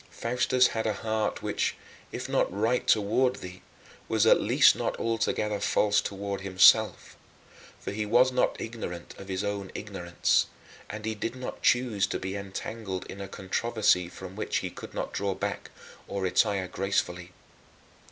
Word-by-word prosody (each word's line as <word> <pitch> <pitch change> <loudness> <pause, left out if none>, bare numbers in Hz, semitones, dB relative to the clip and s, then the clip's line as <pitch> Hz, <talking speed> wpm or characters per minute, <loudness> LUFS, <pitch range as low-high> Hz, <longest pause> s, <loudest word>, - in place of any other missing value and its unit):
Faustus 125 +2 +2
had 110 0 -2
a 105 - 0
heart 110 -1 -1
which, - - -1 0.4
if - - -5
not - - +1
right 110 +6 0
toward 115 +5 +3
thee, 90 0 -9 0.5
was 110 -1 +3
at - - +6
least - - +5
not - - -2
altogether 110 -2 0
false 100 +1 +2
toward 100 0 -4
himself; 95 -1 +4 0.6
for - - -5
he 105 +1 -2
was 125 +5 +4
not 125 - +1
ignorant 100 -7 -6
of 95 - -9
his 95 0 -2
own 100 -1 -3
ignorance, 95 -4 0 0.4
and 105 +1 -6
he 110 - -1
did 115 +3 -4
not 125 0 -7
choose 115 -6 +2
to - - -2
be 95 +1 -4
entangled 100 0 -5
in 100 - -8
a 100 - -5
controversy 100 -2 +1
from 95 +1 -10
which 110 - -1
he - - -4
could - - -10
not - - -3
draw 100 -1 -1
back - - -4 0.4
or 100 -1 -3
retire 95 0 +2
gracefully. 90 -2 -2
100 Hz, 160 wpm, -28 LUFS, 95-110 Hz, 0.6 s, at